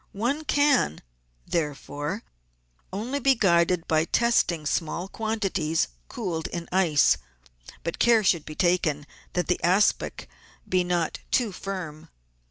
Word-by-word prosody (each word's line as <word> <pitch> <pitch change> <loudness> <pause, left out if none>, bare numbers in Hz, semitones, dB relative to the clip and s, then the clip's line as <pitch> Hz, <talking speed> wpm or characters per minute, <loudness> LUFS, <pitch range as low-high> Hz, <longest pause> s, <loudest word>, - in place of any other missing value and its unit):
One 270 +9 -1
can, 285 - +2 0.4
therefore, 150 +3 -3 0.7
only 235 +9 -3
be 270 0 +4
guided 170 -4 +2
by 155 0 +2
testing 180 -8 +2
small 165 +4 -1
quantities 195 - -1 0.2
cooled 175 -8 -3
in 170 -1 -6
ice, 175 -6 +4 0.7
but 170 - -4
care 235 -2 +5
should 170 -5 +2
be 155 - -9
taken 165 -5 +1 0.3
that 180 - 0
the 180 - -1
aspic 190 +4 +2 0.4
be 185 -1 +2
not 175 -2 -1
too 235 -5 +1
firm. 180 -5 -6
180 Hz, 120 wpm, -26 LUFS, 160-215 Hz, 0.7 s, care